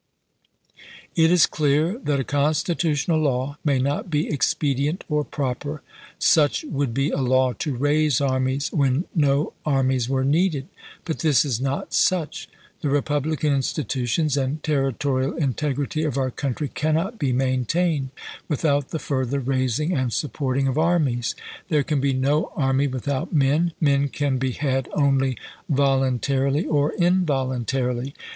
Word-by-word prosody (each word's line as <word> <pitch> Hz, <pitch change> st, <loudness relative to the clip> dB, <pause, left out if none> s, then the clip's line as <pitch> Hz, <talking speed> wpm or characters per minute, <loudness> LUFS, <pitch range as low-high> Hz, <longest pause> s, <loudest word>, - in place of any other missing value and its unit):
" -, -, -25 dB, 0.3 s
It 165 Hz, 0 st, +4 dB
is 180 Hz, -2 st, +6 dB
clear 155 Hz, -, +1 dB
that 145 Hz, -, -1 dB
a -, -, 0 dB
constitutional 155 Hz, +2 st, 0 dB
law 140 Hz, -1 st, -1 dB
may 140 Hz, -3 st, +2 dB
not 140 Hz, +6 st, -1 dB
be 150 Hz, -1 st, 0 dB
expedient 145 Hz, +2 st, 0 dB
or 150 Hz, -2 st, 0 dB
proper. 145 Hz, +1 st, -4 dB, 0.3 s
Such 150 Hz, -4 st, +3 dB
would 140 Hz, -4 st, -1 dB
be 135 Hz, +5 st, 0 dB
a -, -, -1 dB
law 130 Hz, 0 st, +2 dB
to 150 Hz, -5 st, -2 dB
raise 145 Hz, +1 st, +2 dB
armies 130 Hz, 0 st, 0 dB
when 140 Hz, +2 st, +1 dB
no 145 Hz, -3 st, +1 dB
armies 130 Hz, -4 st, +1 dB
were 135 Hz, -1 st, +1 dB
needed. 150 Hz, -1 st, +1 dB, 0.4 s
But 160 Hz, -, -3 dB
this 150 Hz, -4 st, +3 dB
is 125 Hz, -4 st, -1 dB
not 135 Hz, +1 st, -3 dB
such. 175 Hz, -5 st, 0 dB, 0.3 s
The 145 Hz, -, -1 dB
republican 145 Hz, +1 st, 0 dB
institutions 135 Hz, +1 st, -1 dB
and 140 Hz, +3 st, -2 dB
terri 135 Hz, -5 st, 0 dB
torial 135 Hz, -1 st, -1 dB
integrity 145 Hz, 0 st, -1 dB
of 150 Hz, -4 st, -1 dB
our 130 Hz, -1 st, 0 dB
country 140 Hz, +3 st, -3 dB
cannot 165 Hz, +9 st, -1 dB
be 140 Hz, -4 st, 0 dB
main 130 Hz, 0 st, 0 dB
tained 160 Hz, -2 st, 0 dB, 0.4 s
without 145 Hz, -2 st, 0 dB
the -, -, -3 dB
further 135 Hz, -2 st, -1 dB
raising 130 Hz, +4 st, 0 dB
and 130 Hz, -5 st, 0 dB
supporting 135 Hz, +1 st, -1 dB
of 135 Hz, +3 st, 0 dB
armies. 155 Hz, -8 st, +1 dB, 0.3 s
There 150 Hz, -3 st, +2 dB
can 150 Hz, -3 st, -1 dB
be 140 Hz, 0 st, +2 dB
no 140 Hz, +4 st, +1 dB
army 135 Hz, 0 st, +1 dB
without 140 Hz, +6 st, -3 dB
men. 155 Hz, +4 st, +2 dB
Men 140 Hz, -2 st, +2 dB
can 140 Hz, -2 st, -1 dB
be 130 Hz, -1 st, -1 dB
had 135 Hz, -2 st, -1 dB
only 135 Hz, -3 st, +2 dB, 0.3 s
voluntarily 135 Hz, 0 st, +1 dB
or 145 Hz, -1 st, +1 dB
involuntarily. 135 Hz, -, 0 dB
140 Hz, 145 wpm, -23 LUFS, 130-150 Hz, 0.4 s, is